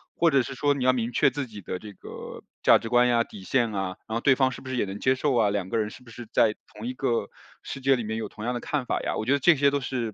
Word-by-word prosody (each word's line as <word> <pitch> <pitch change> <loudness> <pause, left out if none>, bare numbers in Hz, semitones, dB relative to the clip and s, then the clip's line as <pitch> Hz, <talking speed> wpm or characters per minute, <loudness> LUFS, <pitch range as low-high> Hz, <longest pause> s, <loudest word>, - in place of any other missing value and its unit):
或 170 -1 +3
者 135 -2 +4
是 130 +2 -6
说 145 +2 +2
你 140 -2 -3
要 130 - +6
明 120 -1 -1
确 125 - +4
自 140 +2 -4
己 105 -3 -10
的 90 - -4
这 105 +1 -10
个 - - -9 0.2
价 - - +7
值 115 - -6
观 125 0 +4
呀 120 -1 +3
底 100 - -11
线 120 +2 +1
啊， 95 -2 -3
然 110 - -3
后 115 - -1
对 135 - +5
方 130 0 +3
是 - - -8
不 130 - -9
是 130 - -2
也 120 - +1
能 100 0 -6
接 130 - +4
受 135 0 0
啊， 110 -4 +3
两 100 -2 -2
个 - - -1
人 105 -1 0
是 - - -13
不 125 - -16
是 120 +1 -9
在 110 -2 +4 0.2
同 110 +3 -6
一 125 - -3
个 120 -5 -1 0.3
世 - - -7
界 135 +1 +4
里 120 - -3
面 110 +1 -3
有 115 - -3
同 105 - -10
样 125 - 0
的 - - -2
看 145 -4 -2
法 - - 0
呀。 - - -2
我 - - -2
觉 125 - +1
得 140 - +4
这 165 +5 +5
些 140 0 +4
都 140 0 0
是 125 -4 -3
120 Hz, 355 characters per minute, -26 LUFS, 110-135 Hz, 0.3 s, 价